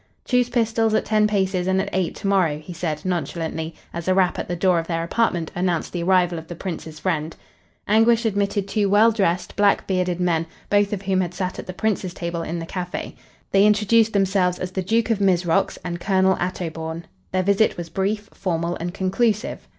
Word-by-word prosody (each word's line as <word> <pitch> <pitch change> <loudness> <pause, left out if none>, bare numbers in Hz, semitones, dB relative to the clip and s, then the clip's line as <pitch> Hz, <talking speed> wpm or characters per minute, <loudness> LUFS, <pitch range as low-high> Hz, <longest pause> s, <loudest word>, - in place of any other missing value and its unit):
"Choose 250 -1 +2
pistols 225 -2 +1
at - - +1
ten 215 -1 +3
paces 190 -3 0
and 190 0 +2
at 195 - -1
eight 185 -2 0
tomorrow," 190 -7 +1
he 155 +4 -9
said, 160 -2 -3
nonchalantly, 165 -1 -3 0.2
as 170 0 -5
a 185 - +3
rap 185 -2 +2
at - - -4
the 175 - -2
door 180 0 +3
of 165 - -5
their 165 -1 -1
apartment 175 -3 0
announced 175 -2 -1
the 175 - -2
arrival 175 -1 +2
of 160 - -12
the 175 - -7
Prince's 165 -3 -6
friend. 160 -2 -2 0.5
Anguish 225 +2 +4
admitted 200 -1 0
two 205 0 +1
well 215 +3 +5
dressed, 185 -5 0
black 205 -1 +3
bearded 180 -2 0
men, 165 -2 +1 0.2
both 205 0 +3
of 200 -2 -3
whom 190 -1 +1
had 180 -1 -3
sat 185 0 -3
at - - -7
the - - -4
Prince's 190 -3 -1
table 170 -1 -3
in 165 +1 -4
the 165 - -4
cafe. 180 +1 -5 0.4
They 195 0 +5
introduced 210 +2 +4
themselves 190 -2 +2
as 185 0 -4
the 190 - -2
Duke 225 +5 +1
of 220 - +1
Mizrox 180 -3 +2
and 175 -1 -3
Colonel 190 0 +2
Attobawn. 165 -2 -4 0.3
Their 185 0 +1
visit 200 +3 +2
was 170 -1 -6
brief, 200 +4 -2
formal 170 -2 -2
and 175 +2 -5
conclusive. 215 +5 0
185 Hz, 200 wpm, -22 LUFS, 170-205 Hz, 0.5 s, well